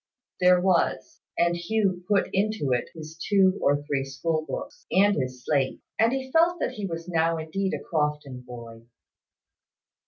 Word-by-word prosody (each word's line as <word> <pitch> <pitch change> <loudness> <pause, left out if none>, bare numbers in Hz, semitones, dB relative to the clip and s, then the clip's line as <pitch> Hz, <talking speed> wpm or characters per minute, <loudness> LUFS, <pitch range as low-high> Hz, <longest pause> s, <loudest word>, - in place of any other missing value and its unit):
There 180 0 +5
was: 180 -1 0 0.2
and 170 0 +2
Hugh 185 0 0
put 205 -2 +2
into 200 -8 0
it 125 - 0
his 155 0 -9
two 195 -2 +3
or 145 +1 +2
three 140 -2 -1
school 155 +4 -2
books, - - -6
and 205 +1 +4
his 130 -2 -4
slate; 140 -3 0 0.2
and 225 +1 +4 0.2
felt 335 +2 +4
that - - -1
he 205 -2 -5
was 165 -1 -6
now 165 -1 +1
indeed 190 +5 -2
a - - -7
Crofton 150 -5 -2
boy. 115 -2 -11
165 Hz, 155 wpm, -26 LUFS, 145-195 Hz, 0.2 s, There